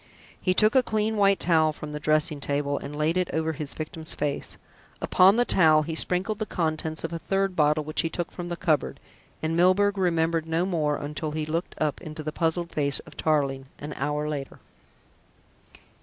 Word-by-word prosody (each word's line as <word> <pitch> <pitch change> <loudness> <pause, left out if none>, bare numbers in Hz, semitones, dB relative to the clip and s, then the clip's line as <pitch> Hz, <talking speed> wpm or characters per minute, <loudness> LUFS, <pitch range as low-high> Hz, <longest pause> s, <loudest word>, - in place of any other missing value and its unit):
He 185 -1 +1
took 215 +3 +4
a 260 - +6
clean 220 -2 -1
white 200 -1 +3
towel 160 -2 +3
from 150 0 -8
the 150 - -5
dressing 155 0 +1
table 145 0 -1
and 145 +1 -7
laid 155 +3 +1
it 180 -1 0
over 160 0 0
his 150 -1 -3
victim's 160 +1 -3
face. 145 -1 -2 0.4
Upon 190 +3 +5
the 245 +1 +3
towel 155 -7 +5
he 165 +2 -4
sprinkled 185 +6 -1
the 215 - -2
contents 160 -2 -2
of 165 - -4
a 165 - -3
third 195 +1 -1
bottle 150 -1 +3
which 155 +1 +1
he 165 - -2
took 175 +1 -4
from 175 -1 -6
the 175 - -4
cupboard, 160 -5 0 0.4
and 160 +1 0
Milburgh 195 +3 +3
remembered 165 -2 +1
no 165 +2 +1
more 155 -6 0
until 150 +2 -4
he 155 0 -2
looked 165 +3 -3
up 150 -2 -1
into 155 -2 -7
the 155 - -3
puzzled 165 +2 -1
face 140 -2 +1
of - - -15
Tarling 140 -4 0
an 150 +1 -7
hour 150 +2 -2
later. 145 -3 -5
160 Hz, 195 wpm, -26 LUFS, 150-180 Hz, 0.4 s, a